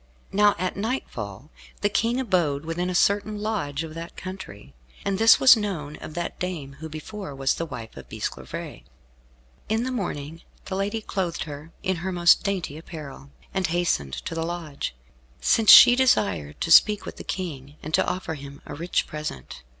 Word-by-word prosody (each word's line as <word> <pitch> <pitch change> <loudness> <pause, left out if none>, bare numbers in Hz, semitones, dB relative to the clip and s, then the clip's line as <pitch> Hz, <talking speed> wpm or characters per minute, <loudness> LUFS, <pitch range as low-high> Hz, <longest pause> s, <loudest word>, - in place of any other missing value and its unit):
Now 205 +1 +4
at 185 - -2
nightfall 150 - -4 0.3
the 205 - +3
King 230 +4 +1
abode 165 - 0
within 175 +2 -2
a 180 - -2
certain 205 +3 +2
lodge 200 -9 -2
of 160 -1 -7
that 165 +1 -8
country, 185 - -8 0.3
and 195 -1 0
this 225 0 +7
was 260 - +9
known 175 -9 -4
of 155 - -9
that 175 0 -4
dame 155 -7 -5
who 160 0 -7
before 155 +1 -7
was 135 0 +1
the 165 - -4
wife 115 -6 -8
of - - -11
Bisclavaret. - - -6 0.9
In 220 +2 +1
the 260 - -2
morning 165 - -4 0.2
the 190 - -4
lady 205 +3 -2
clothed 185 -5 -2
her 150 +1 -9
in 190 -1 0
her 185 +3 -3
most 175 -1 +5
dainty 185 -7 -2
apparel, 145 -4 -9 0.2
and 190 -2 0
hastened 160 - 0
to 65 - -5
the 165 - -2
lodge, 165 - -4 0.4
since 225 -2 +3
she 245 - +11
desired 95 - +1
to 165 - -1
speak 210 +5 +6
with - - -8
the - - -7
King, 145 -6 -5
and 155 - -6
to - - +4
offer 180 -3 -2
him 140 -1 -9
a - - -7
rich 170 +4 -1
present. 75 - -7
170 Hz, 180 wpm, -25 LUFS, 145-200 Hz, 0.9 s, she